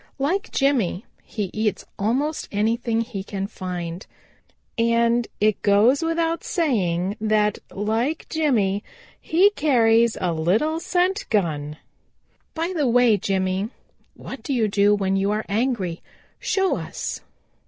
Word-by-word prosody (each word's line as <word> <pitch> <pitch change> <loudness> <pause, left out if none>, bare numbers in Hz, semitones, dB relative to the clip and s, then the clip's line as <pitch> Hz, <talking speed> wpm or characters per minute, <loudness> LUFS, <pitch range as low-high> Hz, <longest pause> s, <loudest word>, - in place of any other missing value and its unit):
Like 360 +10 -1
Jimmy 250 -9 +1 0.2
he 205 -5 -4
eats 215 -1 -1
almost 265 +9 -1
anything 225 +2 0
he 220 -5 -5
can 195 -1 -4
find. 180 -3 -6 0.7
And 235 0 +2
it 215 0 +2
goes 215 +8 +4
without 330 0 0
saying 200 - 0
that, 215 -1 +2
like 225 +9 -1
Jimmy, 225 -11 +1 0.4
he 370 +6 +4
carries 235 - +3
a 180 -2 0
little 210 - +1
scent 365 +3 0
gun. 150 -7 -1 0.8
By 335 +3 -2
the 295 -5 +1
way, 240 -2 +5
Jimmy, 190 +1 -1 0.5
what 265 - -9
do 275 - -3
you 225 -3 +2
do 205 0 +3
when 195 -1 0
you 195 +1 +1
are 210 +1 -1
angry? 205 -6 -1 0.4
Show 385 -1 +1
us." - - -5
220 Hz, 125 wpm, -23 LUFS, 195-275 Hz, 0.8 s, way